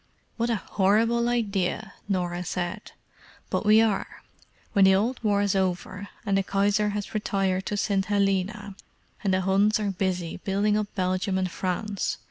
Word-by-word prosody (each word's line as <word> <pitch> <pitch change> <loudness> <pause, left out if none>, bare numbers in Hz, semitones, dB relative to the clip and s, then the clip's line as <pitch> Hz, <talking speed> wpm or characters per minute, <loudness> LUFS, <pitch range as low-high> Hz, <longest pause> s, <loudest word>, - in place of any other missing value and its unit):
"What 235 0 -1
a 230 - +2
horrible 225 +4 +2
idea!" 205 -3 -1 0.2
Norah 180 -2 -1
said. 180 +3 -4 0.6
"But 215 - -1
we 215 +1 +7
are—when 205 -1 -2
the 190 0 +6
old 235 +6 -1
War's 205 -2 +2
over, 190 +1 -2 0.2
and 200 -2 +1
the 195 - +3
Kaiser 205 +2 +1
has 205 0 -4
retired 195 -3 0
to 205 - -2
St. 195 -1 +1
Helena, 200 0 0 0.5
and 195 - +1
the 185 0 +2
Huns 200 +3 +3
are 205 -2 -1
busy 180 -2 -2
building 200 +3 0
up 210 -1 0
Belgium 185 +1 0
and 185 -1 -1
France. 195 +3 -2
200 Hz, 150 wpm, -26 LUFS, 190-210 Hz, 0.6 s, we